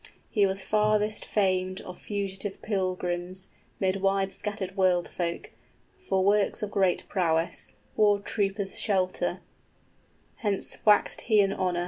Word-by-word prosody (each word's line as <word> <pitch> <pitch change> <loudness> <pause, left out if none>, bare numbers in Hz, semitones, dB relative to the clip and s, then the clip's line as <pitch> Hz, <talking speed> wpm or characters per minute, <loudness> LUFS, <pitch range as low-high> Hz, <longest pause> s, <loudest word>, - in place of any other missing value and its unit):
} - - -35
He 205 -3 +4
was 190 0 -2
farthest 215 0 +2
famed 185 -2 0
of 180 - -10
fugitive 200 -1 -4
pilgrims, 185 -2 -2 0.3
Mid 190 0 +1
wide 195 0 +2
scattered 200 -2 -2
world 185 -3 +2
folk, 170 -1 -4 0.4
for 190 - -1
works 205 +1 +2
of 205 - -3
great 190 -3 +1
prowess, 165 -3 0 0.2
War 205 -1 +4
troopers' 200 -1 -2
shelter: 185 -3 0 1.0
hence 205 -4 -1
waxed 210 -1 +4
he 215 -2 +5
in 195 -1 +3
honor. 180 -2 -1
195 Hz, 130 wpm, -27 LUFS, 185-205 Hz, 1.0 s, he